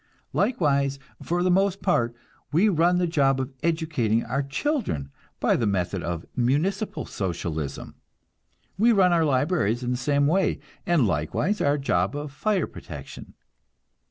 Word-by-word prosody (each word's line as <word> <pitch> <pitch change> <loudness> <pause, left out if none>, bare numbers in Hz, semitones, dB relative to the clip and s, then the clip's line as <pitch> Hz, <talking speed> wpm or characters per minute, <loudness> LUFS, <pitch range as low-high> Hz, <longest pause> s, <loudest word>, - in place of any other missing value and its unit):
Likewise, 140 - +1 0.2
for 175 +1 -1
the 185 - +3
most 195 +1 +2
part, 120 -10 +1 0.4
we 180 +8 +4
run 175 0 +3
the 180 - +2
job 140 -5 +2
of 130 +1 -4
educating 155 -9 0
our 140 - -1
children 140 - -2 0.3
by - - +3
the 115 - 0
method 95 -1 -1
of 85 0 -4
municipal 150 - 0
Socialism. 80 -6 -4 0.9
We 235 +3 +5
run 185 -4 +4
our 165 -1 +3
libraries 130 - +1
in 125 - -1
the 125 - 0
same 140 +3 +1
way, 185 +6 +2 0.3
and 170 -8 +3
likewise 95 - 0
our 145 +1 +2
job 95 -6 0
of 145 0 -5
fire 195 +5 0
protection. - - -10
145 Hz, 145 wpm, -25 LUFS, 115-175 Hz, 0.9 s, We